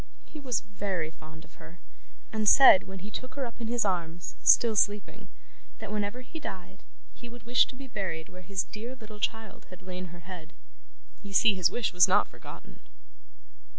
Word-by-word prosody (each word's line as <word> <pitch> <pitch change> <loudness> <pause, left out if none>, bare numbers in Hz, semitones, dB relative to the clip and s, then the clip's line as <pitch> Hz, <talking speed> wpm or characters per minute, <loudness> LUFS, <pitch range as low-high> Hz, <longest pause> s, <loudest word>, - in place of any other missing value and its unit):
He 310 - -11
was 255 -5 -1
very 195 -6 -4
fond 160 0 -14
of - - -21
her, 170 - -13 0.6
and 215 -1 +3
said 265 -8 +8
when 190 0 -8
he 210 - -8
took 255 +5 -7
her 275 -2 -2
up 235 0 -9
in 230 - -3
his 235 -1 0
arms, 175 -2 -3
still 230 -2 +5
sleeping, 205 0 0 0.5
that 220 -2 -8
whenever 210 +3 -3
he 320 +6 -9
died 190 -7 -8 0.3
he 240 - -11
would 240 -1 -12
wish 245 +2 +3
to 260 - -9
be 275 +1 -9
buried 190 -10 -4
where 180 - -12
his 190 0 -2
dear 235 +4 -8
little 215 -4 -12
child 225 0 -4
had 185 -1 -13
laid 185 0 -6
her 175 0 -12
head. 170 -2 -10 0.7
You 200 -2 -10
see 215 +2 +5
his 185 -3 +2
wish 240 -6 -2
was 180 -1 +6
not - - +3
forgotten. - - -13
205 Hz, 190 wpm, -28 LUFS, 180-235 Hz, 0.7 s, said